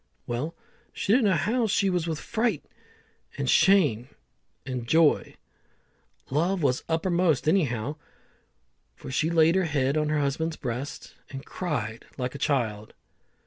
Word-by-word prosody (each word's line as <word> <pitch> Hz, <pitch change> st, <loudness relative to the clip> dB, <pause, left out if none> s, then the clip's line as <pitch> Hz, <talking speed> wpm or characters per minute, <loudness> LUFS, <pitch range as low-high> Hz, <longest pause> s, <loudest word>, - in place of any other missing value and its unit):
Well, 140 Hz, +8 st, -3 dB, 0.4 s
she 200 Hz, -, 0 dB
didn't 245 Hz, -1 st, +4 dB
know 195 Hz, -, +4 dB
how 225 Hz, -, +1 dB
she 200 Hz, 0 st, +1 dB
was 175 Hz, -2 st, -1 dB
with 160 Hz, -2 st, -2 dB
fright, 225 Hz, -, -1 dB, 0.7 s
and 140 Hz, -, -2 dB
shame, 140 Hz, -, +4 dB, 0.6 s
and 125 Hz, -3 st, -4 dB
joy. 160 Hz, +2 st, +3 dB, 1.0 s
Love 170 Hz, +5 st, +1 dB
was 130 Hz, -2 st, +1 dB
uppermost 165 Hz, -2 st, +1 dB
anyhow, 145 Hz, -, +1 dB, 1.0 s
for -, -, -9 dB
she 155 Hz, +4 st, +1 dB
laid 165 Hz, -1 st, +4 dB
her 190 Hz, -1 st, +2 dB
head 140 Hz, -2 st, 0 dB
on 150 Hz, -1 st, +1 dB
her 155 Hz, -, +1 dB
husband's 155 Hz, +3 st, -1 dB
breast 130 Hz, +2 st, -5 dB, 0.2 s
and 135 Hz, +1 st, -8 dB
cried 115 Hz, -, -4 dB
like 125 Hz, -1 st, -3 dB
a 140 Hz, -, -8 dB
child. 110 Hz, -8 st, -1 dB
155 Hz, 140 wpm, -26 LUFS, 130-175 Hz, 1.0 s, didn't